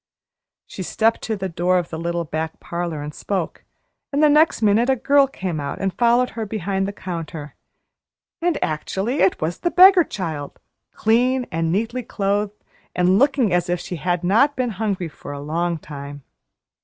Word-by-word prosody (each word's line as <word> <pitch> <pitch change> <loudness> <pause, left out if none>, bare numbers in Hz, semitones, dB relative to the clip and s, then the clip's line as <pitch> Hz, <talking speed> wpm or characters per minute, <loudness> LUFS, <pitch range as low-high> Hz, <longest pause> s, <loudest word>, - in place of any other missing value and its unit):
She - - -8
stepped 225 +5 +1
to 220 - -1
the 190 -2 -3
door 180 +1 +1
of 175 -2 -2
the 160 - -4
little 170 0 -2
back 160 +1 -4
parlor 170 -3 -4
and 150 0 -6
spoke; 190 -1 -4 0.5
and 290 +2 +1
the 300 - +6
next 300 -5 +4
minute 215 +4 +3
a 265 - +4
girl 275 +3 +4
came 185 - -4
out 140 -1 -4
and 195 -1 -1
followed 240 +1 +3
her 225 - -4
behind 195 -2 -2
the - - -3
counter. 165 -6 -6 0.9
And 345 -2 +1
actually 190 - -2
it 190 - +3
was 165 +3 -2
the 345 - 0
beggar 370 0 +7
child, 160 - -5 0.3
clean 250 +3 +2
and 165 0 0
neatly 225 +6 -1
clothed, 205 -2 -2 0.3
and 180 +2 +3
looking 270 -7 +3
as 175 0 +1
if 175 0 0
she 180 0 -6
had 175 +1 -1
not 230 +11 +3
been 250 -2 -1
hungry 200 -4 -2
for 145 -2 -9
a 140 - -6
long 165 +4 -1
time. 145 -2 -9
190 Hz, 180 wpm, -21 LUFS, 165-235 Hz, 0.9 s, beggar